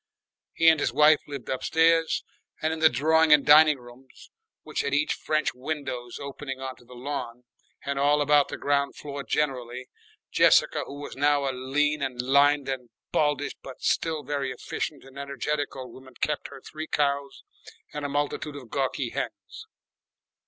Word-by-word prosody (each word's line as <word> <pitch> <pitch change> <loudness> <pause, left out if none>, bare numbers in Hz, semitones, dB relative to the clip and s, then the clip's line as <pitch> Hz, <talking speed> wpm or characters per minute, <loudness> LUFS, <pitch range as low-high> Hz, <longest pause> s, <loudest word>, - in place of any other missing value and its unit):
He 165 - +2
and 160 -2 +7
his 130 - 0
wife 150 +3 +6
lived 140 -4 -7
upstairs, 165 +4 +2 0.4
and 155 +1 0
in 160 - -5
the 160 0 +6
drawing 160 +4 +3
and 150 -2 +6
dining 150 0 +7
rooms, 125 +1 -16 0.3
which - - -2
had 140 0 -1
each 150 +1 +1
French 155 0 -1
windows 125 -3 -5
opening 140 -1 -6
on 130 0 -5
the 125 +1 -15
lawn, 125 -2 -5 0.4
and 140 0 -2
all 145 +1 +3
about 145 0 +4
the - - -6
ground 140 0 0
floor 140 -1 -6
generally, 125 -4 -2 0.4
Jessica, - - +4
who 140 - -8
was - - -7
now 145 0 +2
a - - +1
lean 145 +4 0
and 130 -3 -3
lined 140 +2 +3
and 130 -3 -4 0.2
baldish 145 -1 +1
but 135 - -11
still 160 -2 0
very 140 -1 -2
efficient 135 +3 -5
and 135 +1 -12
energetic 140 +2 -3
old 130 -3 -8
woman, 130 -1 -14
kept 150 -1 -1
her 135 - -12
three 155 +3 -7
cows 140 -1 -1 0.5
and 150 - -5
a 145 - -2
multitude 145 +1 -2
of 130 -5 -10
gawky 135 -2 -1
hens. - - -6
140 Hz, 165 wpm, -26 LUFS, 130-150 Hz, 0.5 s, and